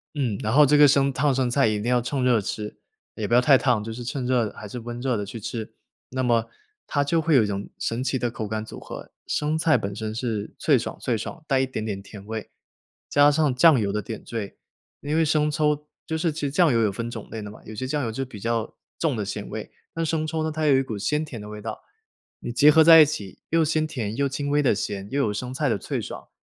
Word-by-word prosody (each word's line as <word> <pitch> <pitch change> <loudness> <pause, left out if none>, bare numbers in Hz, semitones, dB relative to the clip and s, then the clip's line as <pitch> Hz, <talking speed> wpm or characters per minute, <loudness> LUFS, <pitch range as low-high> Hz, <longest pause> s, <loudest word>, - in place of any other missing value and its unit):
嗯， 125 -9 -1
然 110 - -1
后 145 +4 +7
这 145 +2 +4
个 145 0 +8
生 140 -1 +3
烫 145 0 +2
生 130 -2 +1
菜 135 -2 +3
一 105 -1 0
定 105 - -5
要 125 - +3
趁 130 +2 -2
热 120 -4 +3
吃， 105 +1 -5 0.4
也 105 -2 -3
不 - - -2
要 125 - +6
太 135 +1 +6
烫， 120 -6 +1
就 110 +1 -5
是 120 +2 -7
趁 125 +2 -3
热 125 -4 +1
还 105 - -9
是 125 - -6
温 120 +1 -6
热 125 -1 0
的 105 - -2
去 110 +3 -7
吃， 110 +1 -5 0.4
那 130 0 -2
么 115 -2 +2 0.4
它 145 -1 +1
就 160 +3 +1
会 160 -2 +2
有 120 - +6
一 - - +1
种 100 0 -4
神 115 +3 -2
奇 130 0 0
的 120 -2 -1
口 110 -3 -5
感 110 +1 -3
组 - - -9
合。 - - -9 0.2
生 150 +1 0
菜 160 0 +3
本 100 0 -4
身 110 0 -4
是 110 -3 -3
脆 140 -5 +3
爽 115 - -5
脆 120 - 0
爽， 155 +9 -6
带 135 -3 +2
一 135 - +2
点 110 -4 -4
点 100 -3 -4
甜 100 0 -12
味， 110 0 -5 0.6
加 145 0 +5
上 150 -2 +2
酱 145 +1 +6
油 100 -2 0
的 105 - -1
点 110 +2 -7
缀， 110 -4 -5 0.4
因 145 +2 -2
为 165 - +4
生 150 0 +2
抽 150 -1 0 0.2
就 160 - -1
是 165 0 0
其 150 -2 -3
酱 155 -1 +3
油 115 - +3
有 105 - +2
分 115 +4 -4
种 110 -3 -8
类 110 -2 -6
的 105 - -7
嘛， - - -14
有 110 - -9
些 130 - -3
酱 145 +2 -1
油 115 - -2
就 135 +4 -3
比 125 -5 -11
较 115 +1 -2 0.2
重 155 -6 0
的 105 - -2
咸 100 - -5
味， - - -7 0.2
那 165 - -2
生 160 -1 0
抽 160 0 -2
呢， 160 - -1
它 155 0 -2
有 140 - +5
一 135 - +4
股 115 -5 -5
鲜 150 +10 0
甜 130 -7 -7
的 105 - -9
味 105 0 -8
道， 110 +1 -5 0.6
你 - - -5
结 145 +5 +6
合 160 +1 +6
在 160 0 +10
一 - - +8
起， 105 -11 -6
又 165 0 +3
鲜 155 0 +1
甜 115 -8 -4
又 140 +1 +1
轻 140 +1 -3
微 145 +1 +2
地 130 - +4
咸， 100 -1 -4
又 140 +1 +1
有 110 - +1
生 125 +5 -4
菜 145 +1 0
的 115 - +1
脆 - - -3
爽， - - -8
125 Hz, 290 characters per minute, -24 LUFS, 110-150 Hz, 0.6 s, 在